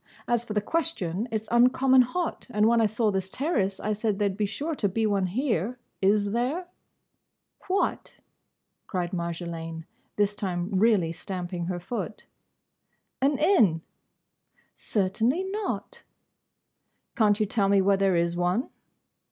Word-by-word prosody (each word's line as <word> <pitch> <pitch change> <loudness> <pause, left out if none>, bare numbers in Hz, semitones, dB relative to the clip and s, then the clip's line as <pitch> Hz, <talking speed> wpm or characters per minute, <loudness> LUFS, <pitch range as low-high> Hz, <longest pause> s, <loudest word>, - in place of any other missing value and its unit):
As 240 -1 +1
for 225 - -6
the 210 - +1
question: 220 - -2
it 220 -1 -2
's - - -19
uncommon 255 +2 +5
hot, 330 +8 -2
and 210 -2 +3
when 230 0 +4
I 220 - +4
saw 215 +1 +1
this 190 -1 -2
terrace 205 - -1
I 215 - -2
said 215 -1 -1
there 205 -1 +2
'd 190 - -5
be 210 0 0
sure 295 +10 -3
to 210 -9 0
be 220 +4 0
one 200 -3 +1
here. 230 - -1 0.2
Is 200 +1 +3
there?" 255 - -1 1.0
"What?" 385 +1 -1 0.7
cried 180 -2 -2
Marjolaine, 170 -2 -4 0.3
this 205 0 +2
time 185 -2 -3
really 195 -4 +3
stamping 175 0 -4
her 175 0 -3
foot. 230 +7 -5 1.0
"An 275 +1 +3
inn?" 225 - +4 0.9
"Certainly 225 - 0
not." 435 +3 -4 1.1
"Can't 210 -2 +3
you 215 - +3
tell 200 -1 +1
me 200 0 +5
where 195 +1 +4
there 195 -2 +2
is 170 0 +1
one?" 180 +7 0
210 Hz, 145 wpm, -27 LUFS, 185-240 Hz, 1.1 s, uncommon